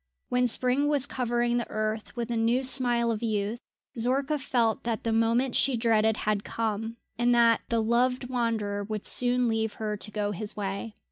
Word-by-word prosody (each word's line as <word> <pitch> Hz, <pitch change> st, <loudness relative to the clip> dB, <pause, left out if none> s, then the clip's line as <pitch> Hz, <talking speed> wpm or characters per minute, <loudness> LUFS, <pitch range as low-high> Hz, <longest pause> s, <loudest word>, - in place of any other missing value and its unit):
When 250 Hz, 0 st, +2 dB
spring 255 Hz, +4 st, +3 dB
was 290 Hz, -3 st, +1 dB
covering 240 Hz, -3 st, -1 dB
the 240 Hz, -, -3 dB
earth 215 Hz, +1 st, -3 dB
with 240 Hz, -1 st, -4 dB
a -, -, -1 dB
new 230 Hz, +3 st, +1 dB
smile 245 Hz, -2 st, +4 dB
of 220 Hz, -, -3 dB
youth, 215 Hz, 0 st, -2 dB, 0.4 s
Zorka 270 Hz, +5 st, +1 dB
felt 235 Hz, -4 st, 0 dB
that 230 Hz, -3 st, -3 dB
the 230 Hz, -, 0 dB
moment 230 Hz, +3 st, +1 dB
she 270 Hz, -3 st, +3 dB
dreaded 220 Hz, -1 st, +2 dB
had 210 Hz, -1 st, 0 dB
come, 225 Hz, 0 st, -3 dB, 0.2 s
and 240 Hz, 0 st, +3 dB
that 230 Hz, -1 st, +4 dB
the 230 Hz, -1 st, +1 dB
loved 250 Hz, +3 st, +1 dB
wanderer 225 Hz, -5 st, -2 dB
would 215 Hz, 0 st, -5 dB
soon 250 Hz, 0 st, +1 dB
leave 220 Hz, -1 st, -1 dB
her 215 Hz, -1 st, -3 dB
to 210 Hz, -, -3 dB
go 210 Hz, -1 st, -2 dB
his 205 Hz, +2 st, -6 dB
way. 200 Hz, +2 st, -4 dB
230 Hz, 185 wpm, -27 LUFS, 215-245 Hz, 0.4 s, smile